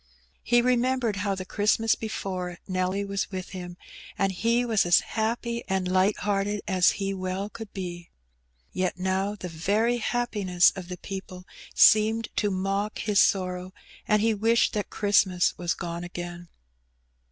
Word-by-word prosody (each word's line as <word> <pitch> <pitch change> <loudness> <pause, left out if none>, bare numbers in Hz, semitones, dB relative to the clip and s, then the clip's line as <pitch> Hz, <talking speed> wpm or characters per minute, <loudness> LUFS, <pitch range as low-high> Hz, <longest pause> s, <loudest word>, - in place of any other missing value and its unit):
He 240 0 +3
remembered 250 -3 +1
how 200 -1 -1
the 185 -1 -6
Christmas 215 +3 +2
before 185 -5 -4
Nelly 185 +1 -1
was 200 0 -2
with 185 -2 -6
him^ 180 -2 -7 0.4
and 195 0 +1
he 230 +6 +1
was 225 -4 +2
as 175 0 +5
happy 235 +1 -2
and 190 -1 -1
light 185 +3 +2
hearted 205 0 -1
as 185 -2 +4
he 195 -1 -2
well 185 +1 -3
could 225 -3 -9
be. 175 -3 -6 0.6
Yet 185 -1 -1
now 190 +2 -1
the 185 -3 -7
very 205 +9 0
happiness 210 -7 +2
of 185 -2 -7
the 180 0 -6
people 185 -2 -8 0.3
seemed 220 +1 +5
to 205 - +2
mock 195 +2 -2
his 210 -2 +1
sorrow^ 185 -1 +1 0.3
and 210 -1 +3
he 225 0 +3
wished 225 +3 +2
that 210 -1 -2
Christmas 195 -3 +2
was 175 -1 -1
gone 170 0 -5
again. 175 -1 -7
195 Hz, 150 wpm, -26 LUFS, 185-215 Hz, 0.6 s, as